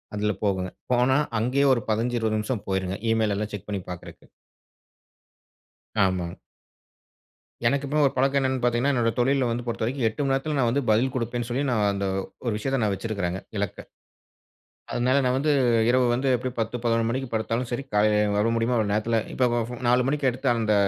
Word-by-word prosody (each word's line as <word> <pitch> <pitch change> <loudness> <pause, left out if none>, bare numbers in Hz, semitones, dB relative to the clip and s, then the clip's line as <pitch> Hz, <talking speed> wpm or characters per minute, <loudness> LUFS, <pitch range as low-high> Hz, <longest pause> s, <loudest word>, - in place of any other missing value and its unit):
அதில 105 0 0
போகுங்க, 95 -2 0 0.2
போனா 125 +2 +3 0.2
அங்கேயே 130 +5 +2
1, 120 - 0
15, 120 +3 0
20 110 -1 0
நிமிஷம் 105 +1 -2
போயிருங்க 95 0 -1
ஈமெயில் 110 -2 +2
எல்லாம் 105 +1 -3
செக் 105 0 -7
பண்ணி 100 -2 -2
பார்க்கறதுக்கு. 90 -1 -9 1.8
ஆமாங்க. 90 -2 -1 1.3
எனக்கு 140 +2 +1
இப்போ 150 - -1
ஒரு 135 - +1
பழக்கம் 135 +1 +2
என்னென்னு 130 -1 0
பாத்தீங்கணா, 120 +3 +2
என்னோட 115 -2 +2
தொழில்ல 130 +1 +2
வந்து 120 +1 -2
பொறுத்தவரைக்கும் 120 +2 -2
8 110 +6 -3
மணி 135 -1 +1
நேரத்துல 145 +3 -1
நான் 120 - +3
வந்து 140 +4 +1
பதில் 115 +5 +3
குடுப்பேன்னு 120 -1 -2
சொல்லி 130 +4 -1
நான் 110 -4 +1
அந்த 100 0 -2 0.4
ஒரு 115 - 0
விஷயத்த 135 +5 -1
நான் 105 -2 +1
வெச்சுருக்குறேங்க, 95 -4 -3 0.2
இலக்க. 100 -2 -2 1.2
அதுனால 130 +3 +2
நான் 125 0 +2
வந்து 150 +2 +2 0.4
இரவு 125 0 +4
வந்து 130 +3 0
எப்டியும் 125 +1 -5
10, 115 +2 -2
11 115 -1 +2
மணிக்கு 130 +2 -2
படுத்தாலும் 115 +2 -1
சரி 125 +3 -2
காலையில 105 0 +3
வர 105 +2 +2
முடியுமோ 115 +2 +1
அவ்வளோ 105 -3 +1
நேரத்துல 110 +2 +1
இப்ப 125 -1 +2 0.4
4 125 +1 +3
மணிக்கு 145 -1 +1
எடுத்த 125 - -2
அந்த 110 -2 +2
120 Hz, 175 wpm, -25 LUFS, 105-130 Hz, 1.8 s, இரவு